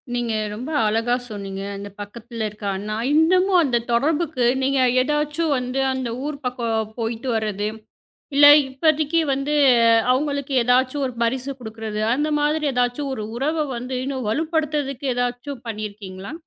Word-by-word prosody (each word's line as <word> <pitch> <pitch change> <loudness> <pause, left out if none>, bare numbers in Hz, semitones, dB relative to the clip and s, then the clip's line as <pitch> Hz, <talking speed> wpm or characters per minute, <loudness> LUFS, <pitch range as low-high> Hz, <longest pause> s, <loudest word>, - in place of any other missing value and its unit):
நீங்க 240 -2 -1 0.2
ரொம்ப 245 +7 -6 0.2
அழகா 225 +3 +1
சொன்னீங்க. 195 -2 -6
அந்தப் 200 0 -9
பக்கத்துல 230 +2 -6
இருக்கான்னா 205 0 -4 0.2
இன்னமும் 365 +4 +4
அந்தத் 240 -5 0
தொடர்புக்கு 295 +1 +1 0.2
நீங்க 270 0 +2 0.2
எதாச்சும் 300 +3 0
வந்து 250 +1 -3
அந்த 260 -2 -3 0.2
ஊர் 300 -1 -3
பக்கம் 225 -3 -2
போயிட்டு 230 +3 -3
வர்றது, 210 -2 -1 0.7
இல்ல 290 +1 +7 0.2
இப்போதைக்கு 310 +4 +1
வந்து 275 +2 -1 0.6
அவங்களுக்கு 280 +1 -1
எதாச்சும் 255 +3 +2
ஒரு 250 - -8
பரிசு 260 +3 -1
கொடுக்கறது? 220 -2 -5
அந்த 295 +4 0
மாதிரி 300 +1 +1
எதாச்சும் 250 +3 0
ஒரு 215 - -5
உறவை 305 +4 0
வந்து 250 +2 -5
இன்னும் 265 -4 -3
வலுப்படுத்தறதுக்கு 295 -1 -1
எதாச்சும் 245 +2 -3
பண்ணி 215 -1 -4
இருக்கீங்களா? 195 0 -9
255 Hz, 135 wpm, -22 LUFS, 225-290 Hz, 0.7 s, இல்ல